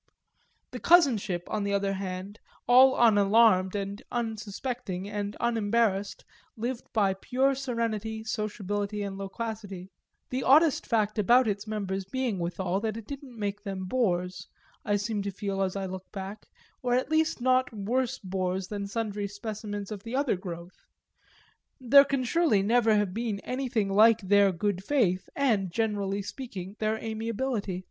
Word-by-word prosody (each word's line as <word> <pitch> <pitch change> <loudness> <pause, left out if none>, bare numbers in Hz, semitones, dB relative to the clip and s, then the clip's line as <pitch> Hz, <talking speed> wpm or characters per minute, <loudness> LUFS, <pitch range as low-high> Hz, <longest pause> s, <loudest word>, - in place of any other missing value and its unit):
The - - -6
cousinship, 240 - +4
on 210 - -2
the 200 0 0
other 200 0 0
hand, 190 +2 -5 0.3
all 260 +2 +7
unalarmed 205 -3 +5
and 200 0 -4
unsuspecting 220 -3 -4
and 205 0 -4
unembarrassed, 225 -3 0 0.3
lived 240 +2 -4
by 200 -4 +2
pure 260 +8 +1
serenity, 230 -4 -3
sociability 205 -1 -3
and 200 -1 -4
loquacity; 195 -2 -6 0.4
the 255 +1 -1
oddest 300 +2 +4
fact 215 -2 +1
about 240 +4 +5
its 205 0 -2
members 195 -3 -3
being 230 0 -2
withal 180 +2 -1
that 220 0 -3
it 225 - -8
didn't 275 -2 -9
make 205 -1 -3
them 195 -2 -5
bores, 185 -5 -1 0.4
I 205 - +1
seem 205 +1 -1
to 200 - -3
feel 195 0 -3
as 190 0 -1
I 195 -1 -2
look 185 0 -7
back, 195 +1 -7 0.3
or 245 -1 +1
at 255 +4 -1
least 315 -1 +2
not 255 +1 +2
worse 230 +4 -1
bores 185 0 -3
than 200 -1 -4
sundry 205 -1 -3
specimens 205 0 -6
of 205 -2 -5
the 230 +4 -5
other 275 -5 +1
growth. 175 -1 -9 1.0
There 275 +2 +7
can 275 -2 -1
surely 250 - +2
never 225 +1 +3
have 205 -3 +1
been 220 -2 -2
anything 250 -5 -1
like 220 +3 +5
their 200 0 +4
good 190 +1 -2
faith 195 -9 +1
and, 220 -9 +1
generally 205 -2 -1
speaking, 200 -5 -7
their 215 0 0
amiability. 220 -2 -3
210 Hz, 150 wpm, -28 LUFS, 195-235 Hz, 1.0 s, all